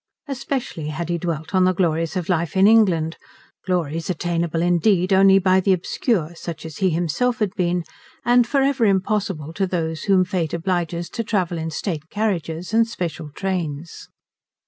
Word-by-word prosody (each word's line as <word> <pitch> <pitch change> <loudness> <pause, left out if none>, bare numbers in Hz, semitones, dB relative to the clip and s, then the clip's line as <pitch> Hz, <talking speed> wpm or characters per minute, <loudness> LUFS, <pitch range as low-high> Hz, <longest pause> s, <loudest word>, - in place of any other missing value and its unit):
Especially 250 - -4
had 155 +2 -4
he 170 0 0
dwelt 165 0 -4
on 185 -1 +4
the 185 0 +3
glories 165 -1 0
of 180 -2 -3
life 170 -1 0
in 190 - +6
England, 185 -8 +4 0.5
glories 165 -3 -1
attainable 170 -1 -1
indeed 180 +2 +2
only 195 0 +6
by 190 0 +4
the 190 +1 +3
obscure 180 - -1
such 170 -1 -7
as 160 -2 -8
he 190 - +2
himself 175 - 0
had 210 -5 -1
been, 180 -2 0 0.4
and 240 0 +4
for 275 -1 +2
ever 270 -4 +2
impossible 190 -5 0
to 190 +2 0
those 160 -3 -3
whom 190 -2 +4
Fate 175 -3 -2
obliges 170 -1 -2
to 230 - -3
travel 185 -6 -1
in 160 0 -3
state 160 -1 -4
carriages 180 -4 -2
and 225 0 +4
special 165 -8 -5
trains. 170 -5 -4
180 Hz, 170 wpm, -22 LUFS, 165-195 Hz, 0.5 s, in